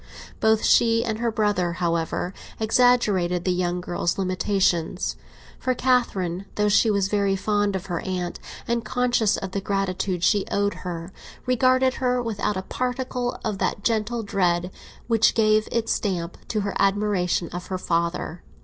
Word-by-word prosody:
Both 220 0 +3
she 230 0 +4
and 220 -2 -2
her 235 -1 0
brother, 205 -6 0
however, 170 +1 -1 0.3
exaggerated 215 -7 +2
the 185 - +2
young 180 0 -1
girl's 175 -1 -1
limitations; 185 -2 0 0.4
for 255 -1 0
Catherine, 195 -9 0
though 210 0 +2
she 220 +2 +4
was 200 -2 +2
very 200 -1 +1
fond 205 +1 0
of 185 - -4
her 175 -3 -3
aunt, 180 -2 -4 0.3
and 235 0 0
conscious 240 -2 +1
of 190 - -5
the 200 - -2
gratitude 190 -2 -1
she 205 -1 +3
owed 205 0 +1
her, 175 0 -5 0.3
regarded 255 +1 +3
her 250 -1 +2
without 220 -4 -2
a 190 - -3
particle 250 +1 -3
of 210 -3 -2
that 200 - -1
gentle 225 +1 0
dread 180 -3 0 0.3
which 225 -2 +3
gave 215 -1 +3
its 230 -1 0
stamp 175 -4 -1
to 215 - -1
her 200 0 -2
admiration 195 -3 +1
of 175 0 -7
her 185 - -2
father. 170 -1 -2
200 Hz, 155 wpm, -24 LUFS, 180-225 Hz, 0.4 s, she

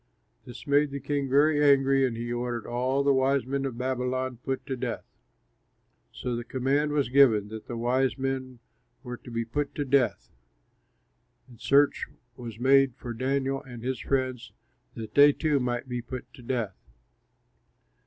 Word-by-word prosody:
This 120 - -10
made 145 +1 +3
the 140 0 -5
king 140 -1 -2
very 145 +2 +4
angry 135 -1 +4
and 115 -2 -5
he 120 +1 -3
ordered 120 -1 -3
all 130 +3 0
the 140 0 +4
wise 135 0 +2
men 135 +1 -2
of 130 -3 -4
Babylon 130 0 -2
put 135 0 -3
to 135 - -3
death. 125 -2 -4 1.1
So 125 -1 -4
the 120 - -4
command 135 +4 0
was 145 -4 0
given 120 -6 +4
that 110 0 -9
the 120 - -5
wise 125 +3 +1
men 130 -1 -3 0.5
were 125 -2 -6
to 125 - -13
be 115 -1 -2
put 145 +5 -3
to 145 - -2
death. 135 -2 +1 1.2
And 120 -3 -17
search 140 +1 +3 0.3
was 115 -4 -8
made 135 0 +4
for 120 -2 -7
Daniel 135 +2 -1
and 120 -3 -10
his 130 -1 -2
friends 130 -3 -2 0.4
that 110 -2 -7
they 145 0 +7
too 150 -2 +1
might 125 0 -2
be 125 -1 -3
put 125 +1 -8
to - - -13
death. 120 -5 -2
130 Hz, 165 wpm, -27 LUFS, 120-140 Hz, 1.2 s, they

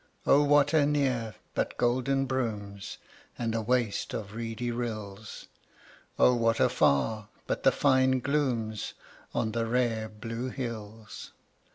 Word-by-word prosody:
O 140 - +6
what 145 0 +4
anear 140 -7 +1 0.2
but - - -2
golden 130 +3 +1
brooms, 105 -7 -3 0.4
And 115 -2 -1
a 115 - 0
waste 120 -2 0
of 100 -1 -5
reedy 115 +1 -3
rills! 110 -3 -5 0.7
O 125 - +6
what 115 -1 +2
afar 105 +10 +2 0.2
but - - -2
the - - +5
fine 130 0 +3
glooms 125 -6 -1 0.4
On 110 - 0
the 115 0 -1
rare 115 -2 0
blue 115 +3 -5
hills! 110 -4 -7
115 Hz, 125 wpm, -29 LUFS, 110-130 Hz, 0.7 s, O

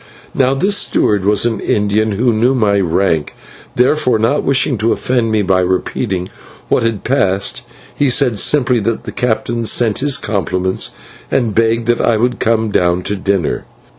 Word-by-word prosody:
Now 135 0 +1
this 195 +8 +1
steward 100 -2 +1
was 105 +1 +3
an 115 -3 -1
Indian 105 +1 0
who 120 +4 +1
knew 120 +5 +2
my 105 -4 +2
rank. 85 -4 0 0.4
Therefore 125 -1 +2
not 115 +7 0
wishing 135 0 +1
to 115 +2 +1
offend 120 -3 0
me 110 -1 +1
by 95 -1 +2
repeating 90 +1 -2 0.4
what - - +2
had 115 -3 -2
passed, 100 -7 0 0.3
he 145 - +1
said 125 -4 +1
simply 125 -2 +2
that 115 +1 -2
the - - -7
captain 115 0 -2
sent 115 -3 +1
his 140 -1 +2
compliments 95 -2 -2 0.4
and 120 -5 0
begged 115 +1 +1
that 120 0 +1
I 115 - +2
would 125 +2 -1
come 110 -1 0
down 90 -1 +1
to 105 - -2
dinner. 95 -4 -2
110 Hz, 165 wpm, -15 LUFS, 100-125 Hz, 0.4 s, was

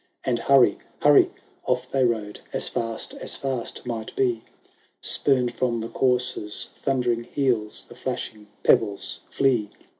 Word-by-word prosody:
And, 120 -2 0
hurry! 130 -4 +5 0.2
hurry! - - +7 0.4
off - - 0
they 135 -1 +2
rode, 110 -4 -1
As - - +1
fast 115 -1 -2
as - - -1
fast 130 -4 -4
might 115 -2 -5
be; 120 -4 +1 0.6
Spurned 125 -4 +1
from 120 -2 0
the 115 +1 -4
courser's 125 -5 0
thundering 125 -3 0
heels 120 -7 -1
The - - -12
flashing 105 -1 -5 0.2
pebbles 100 -3 +2
flee. 125 -7 +2
120 Hz, 130 wpm, -25 LUFS, 110-130 Hz, 0.6 s, hurry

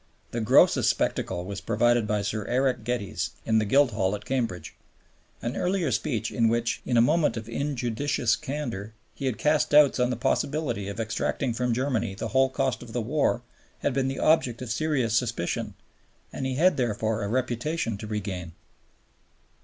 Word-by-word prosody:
The 120 - -2
grossest 110 +4 +5
spectacle 90 -1 -1
was 100 +1 -5
provided 120 0 +2
by 105 -1 0
Sir 105 +1 -2
Eric 125 -1 +1
Geddes 100 -8 -2
in 110 0 +3
the 110 - 0
Guildhall 105 -5 +2
at 105 - -9
Cambridge. 115 -11 -2 0.7
An 120 +3 -2
earlier 180 -5 0
speech 115 0 -1
in 115 -1 +2
which, 115 +1 0
in 125 - +2
a - - +7
moment 150 -1 +2
of 110 -1 -6
injudicious 125 -2 0
candor, 120 -8 -5 0.2
he 135 - -4
had 125 - -1
cast 150 0 +2
doubts 145 -3 +5
on 125 0 +2
the 125 - -1
possibility 120 -3 -1
of 100 +2 -6
extracting 115 +3 -1
from 125 +1 -1
Germany 120 -5 -1
the - - -4
whole 135 0 +3
cost 135 -1 -1
of 115 -2 -10
the 125 - 0
war 125 -1 0 0.4
had 140 - 0
been 135 0 +1
the 135 - -3
object 130 -7 +2
of 120 - -5
serious 130 -3 0
suspicion, 115 -7 -1 0.6
and 135 - -3
he 130 - -2
had 180 +7 +3
therefore 110 -3 0
a 100 - -2
reputation 125 +2 -1
to 110 - -6
regain. 95 -5 -4
120 Hz, 175 wpm, -26 LUFS, 110-135 Hz, 0.7 s, a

